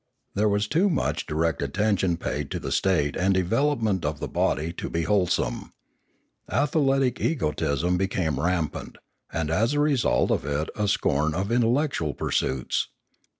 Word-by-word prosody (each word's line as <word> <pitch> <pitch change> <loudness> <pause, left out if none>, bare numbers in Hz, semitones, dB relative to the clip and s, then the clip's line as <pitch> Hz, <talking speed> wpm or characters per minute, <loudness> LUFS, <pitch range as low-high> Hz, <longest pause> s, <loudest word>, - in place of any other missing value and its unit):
There 105 +1 +2
was 105 +1 +1
too 180 - +2
much 160 - -1
direct 80 0 0
attention 90 +4 +1
paid - - -3
to - - -3
the - - -5
state 75 -7 +1
and 95 +1 +2
development 110 0 +1
of 75 0 -2
the - - -3
body 80 +4 0
to - - -5
be 85 0 -1
wholesome. 95 0 0 0.8
Athletic 135 -3 +1
egotism 85 - 0
became 90 -7 -1
rampant, 85 0 -2 0.4
and 80 -1 -2
as 115 - +2
a 145 - +1
result 140 - +2
of - - +1
it 75 +2 -2
a 105 -1 0
scorn 75 -5 +1
of 100 +4 -2
intellectual 120 - +1
pursuits. 65 -1 -1
95 Hz, 150 wpm, -25 LUFS, 80-115 Hz, 0.8 s, There